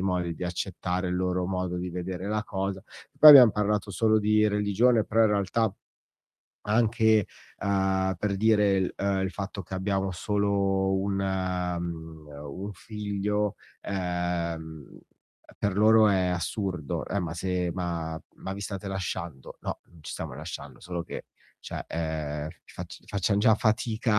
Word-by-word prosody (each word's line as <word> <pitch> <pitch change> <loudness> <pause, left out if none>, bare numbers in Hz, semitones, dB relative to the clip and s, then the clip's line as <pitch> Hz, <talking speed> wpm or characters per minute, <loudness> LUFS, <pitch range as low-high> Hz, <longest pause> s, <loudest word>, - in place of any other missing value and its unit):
modi 90 -3 0
di 90 - -9
accettare 90 +1 -2
il 90 - -1
loro 90 0 0
modo 90 -1 -2
di 90 +1 -3
vedere 90 +1 -5
la 105 +1 0
cosa. 95 -2 -3 0.3
Poi 155 - +11
abbiam 125 -7 +10
parlato 105 -1 0
solo 110 +2 +3
di 105 0 +3
religione, 105 +3 +3
però 115 +1 +3
in 110 - +5
realtà 105 +1 +1 0.9
anche, 110 -1 +3 0.3
uhm, 95 -1 +1
per 100 +2 -1
dire 105 -1 +4
il, 95 -1 0
uhm, 100 -1 0
il 95 - -1
fatto 100 0 -5
che 95 +2 -8
abbiamo 95 0 -1
solo 100 0 +1
un, 100 +1 -1
mh, 90 -4 -3 0.3
un 100 +3 -5
figlio 105 0 -2 0.3
ehm 85 -5 -3 0.6
per 100 -2 -1
loro 110 +1 +6
è 95 -2 +3
assurdo. 90 -2 -2
"Eh, 100 - -1
ma 85 -1 -4
se 90 0 -1
ma 85 -3 -3 0.2
ma 95 - -6
vi 100 - -7
state 100 -1 -5
lasciando?" 85 -6 -5
"No, - - -4
non 85 - -20
ci - - -7
stiamo - - -5
lasciando, 80 +5 -8
solo 90 -1 -4
che - - -8 0.3
cioè, - - -6
ehm, 80 -2 -3 0.2
fac - - -8 0.2
facciam 100 0 0
già 110 +1 +6
fatica 110 -1 +1
95 Hz, 150 wpm, -27 LUFS, 90-105 Hz, 0.9 s, Poi